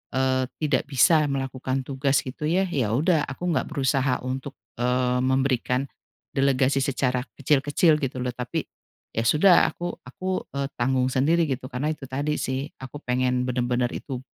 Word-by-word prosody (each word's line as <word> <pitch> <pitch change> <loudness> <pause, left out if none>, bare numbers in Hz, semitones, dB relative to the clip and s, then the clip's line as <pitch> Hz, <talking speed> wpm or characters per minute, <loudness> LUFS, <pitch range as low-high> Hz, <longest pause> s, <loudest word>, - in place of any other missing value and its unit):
eee, 130 -1 +1 0.2
tidak 140 -4 +1
bisa 150 +3 +4
melakukan 135 -1 -2
tugas 135 +1 0
gitu 135 +4 -4
ya, 180 +4 +2
ya 130 - -1
udah 155 +2 +2
aku 175 +7 -3
nggak 160 - 0
berusaha 135 -3 +1
untuk, 135 +2 -4 0.2
eee, 125 0 +1
memberikan 130 -1 +1 0.5
delegasi 135 0 +2
secara 125 -2 0 0.2
kecil-kecil 145 +3 +3
gitu 135 -3 -3
loh, 125 - -1
tapi 125 0 -3 0.5
ya 115 - -1
sudah 175 +7 +6
aku 175 0 -4
aku 185 +9 -3
eee, 140 0 -1
tanggung 130 +1 +2
sendiri 160 +6 +2
gitu. 130 -1 -3
Karena 135 +5 -1
itu 150 -3 -7
tadi 145 +4 -1
sih, 130 +2 -2
aku 130 +2 -8
pengen 125 0 0
bener-bener 125 0 0
itu, 130 -3 -5
135 Hz, 155 wpm, -25 LUFS, 125-145 Hz, 0.5 s, sudah